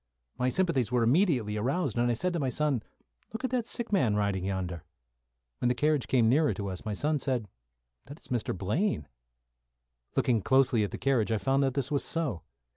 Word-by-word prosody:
My 125 0 +2
sympathies 135 - +1
were 125 -2 +2
immediately 125 - +2
aroused, 135 - -1
and 120 0 +2
I 120 - +1
said 180 +9 -1
to 170 - -1
my 135 -3 0
son, 140 -2 0 0.5
"Look 225 - -6
at 260 - -1
that 245 -3 0
sick 235 -3 -3
man 125 - +3
riding 100 -3 0
yonder." 90 -4 -3 0.8
When 125 - +1
the 125 - +1
carriage 150 0 +1
came 120 -4 +3
nearer 145 +6 +3
to 100 -2 -4
us, 95 -1 -6
my 110 - -3
son 150 +6 0
said, 125 -6 -1 0.6
"That 145 +4 -10
is - - -17
Mr. 120 -6 -1
Blaine." 105 - -1 1.1
Looking 115 -4 +2
closely 125 -1 +3
at 100 - -1
the - - -6
carriage 125 -5 +1
I 110 - +2
found 135 +5 +1
that 135 -2 +1
this 140 -1 -1
was 140 - +1
so. 150 - -2
125 Hz, 200 wpm, -29 LUFS, 110-150 Hz, 1.1 s, man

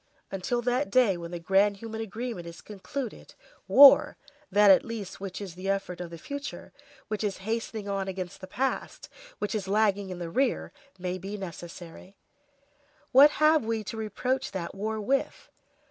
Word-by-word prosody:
Until 240 +6 -2
that 250 +4 0
day 245 -7 +4
when 170 -1 -7
the 175 - -5
grand 195 +4 +2
human 225 +1 -6
agreement 225 -4 -5
is 170 - -10
concluded, 220 +5 -7 0.3
war, 280 0 +8 0.3
that 205 +1 +7
at 190 - +6
least 225 -5 -6
which 195 -2 -5
is 195 -4 -7
the 185 +3 -5
effort 195 -3 -2
of 175 - -6
the 170 - -9
future, 285 - -7 0.3
which 215 0 -3
is 200 -2 -1
hastening 220 -2 -3
on 195 -1 -2
against 185 0 -6
the 185 - -8
past, 265 +7 -3 0.3
which 210 - -3
is 205 -3 -3
lagging 205 -1 +1
in 185 - -5
the 170 -1 -6
rear, 260 +5 0 0.3
may 180 0 -3
be 195 +3 -6
necessary. 175 0 -9 0.9
What 275 +3 +9
have 305 -2 +5
we 225 -1 -2
to 210 - -6
reproach 250 +4 -2
that 180 -3 -4
war 220 +2 -3
with? 265 +6 -2
205 Hz, 170 wpm, -28 LUFS, 185-230 Hz, 0.9 s, What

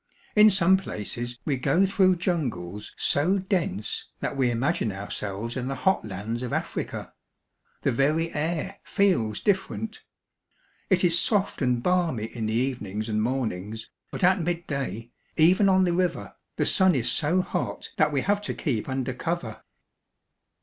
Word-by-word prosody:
In 210 0 +8
some 190 -1 +4
places 120 - -5
we 140 -3 0
go 145 +9 +3
through 190 -1 +3
jungles 120 - -3
so 175 +8 +2
dense 180 - -2
that - - -3
we 130 -2 +2
imagine 120 -2 0
ourselves 100 +3 -4
in 130 -1 -3
the 135 - -2
hot 190 +8 +1
lands 110 +4 -4
of 125 - -4
Africa. - - -4 0.7
The - - +2
very 155 +7 +1
air 170 +5 -2
feels 180 - +1
different. 205 +2 -1 0.9
It 185 -2 +3
is 170 -1 +5
soft 205 -7 0
and 125 -2 +1
balmy 170 -11 +1
in 115 -1 -4
the 110 - -1
evenings 115 -4 -2
and 110 0 0
mornings, 110 -3 -3 0.2
but - - -6
at 185 +1 +4
midday, 140 - -3 0.3
even 185 +5 +5
on 190 0 +4
the 175 -2 +2
river, 180 -1 -1 0.2
the - - 0
sun 190 -3 +4
is 120 -2 +1
so 170 +7 +2
hot - - -4
that - - +3
we 140 -2 +1
have 205 +4 +1
to 210 - -4
keep 125 -5 -2
under 130 -1 -2
cover. 130 -5 -4
140 Hz, 155 wpm, -26 LUFS, 115-185 Hz, 0.9 s, In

